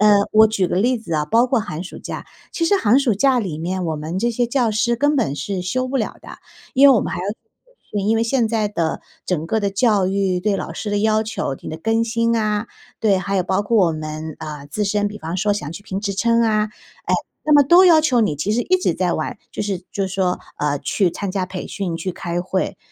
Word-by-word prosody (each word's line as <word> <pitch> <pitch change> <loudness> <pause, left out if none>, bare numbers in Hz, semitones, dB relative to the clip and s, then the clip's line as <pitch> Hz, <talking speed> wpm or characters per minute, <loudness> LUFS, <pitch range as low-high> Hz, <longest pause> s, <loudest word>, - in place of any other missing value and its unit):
呃， 210 -1 +6 0.2
我 220 +1 +7
举 200 -4 0
个 - - -2
例 240 +5 +2
子 170 -7 -5
啊， 150 -1 +1
包 230 +11 +3
括 250 -2 +1
寒 180 -4 -5
暑 - - -9
假， - - -7 0.3
其 335 - -1
实 400 +4 +3
寒 240 - +4
暑 250 -7 +2
假 260 +4 +3
里 170 -7 -4
面 180 +2 -2
我 160 - -1
们 160 +5 -4
这 235 - +1
些 240 +1 0
教 240 -2 +1
师 235 +2 +1
根 290 +4 +2
本 180 - 0
是 180 +5 -3
休 255 +8 -1
不 270 - -1
了 220 - -2
的。 - - -11 0.4
因 275 +2 +7
为 270 - +7
我 - - +3
们 - - -3
还 170 - -3
要 180 - -4 0.7
对， 205 -2 -1
因 220 +3 +2
为 225 - +2
现 230 0 +1
在 215 -2 0
的 165 -5 -2 0.3
整 165 -3 -1
个 220 - +1
的 200 - 0
教 200 -2 +2
育， 190 -1 0
对 200 0 +1
老 - - -5
师 210 - -5
的 205 - +1
要 215 +1 +2
求， 175 -10 -3
你 - - -8
的 155 - -5
更 225 +6 +1
新 230 0 +1
啊， 215 0 -1 0.3
对， 200 -4 +3
还 195 +1 -3
有 185 - +2
包 190 +3 0
括 205 -4 +3
我 - - -1
们， 155 0 -6
呃， 150 -2 -7
自 210 - -1
身 205 +1 0
比 210 - -9
方 165 +3 -4
说 205 +2 +1
想 155 -6 -4
去 200 - -9
评 195 -2 -4
职 200 -2 -2
称 230 +3 +2
啊， 215 -1 +2 0.4
哎， - - +1 0.3
那 305 - +2
么 290 -1 +7
都 350 +6 +7
要 330 -3 +7
求 265 -7 +2
你 155 -9 +1
其 195 +9 -1
实 240 +2 +1
一 370 - +2
直 175 - +1
在 180 -1 0
完 155 - -3 0.2
就 - - -5
是 195 -3 -3
就 195 -1 -1
是 190 - -6
说， 185 -2 0 0.2
呃， 145 -1 0
去 185 +3 0
参 195 +1 -4
加 195 -2 -1
培 185 0 -6
训， 180 -4 -3
去 180 +2 -4
开 175 0 -3
会。 185 +1 -2
205 Hz, 280 characters per minute, -20 LUFS, 180-230 Hz, 0.7 s, 我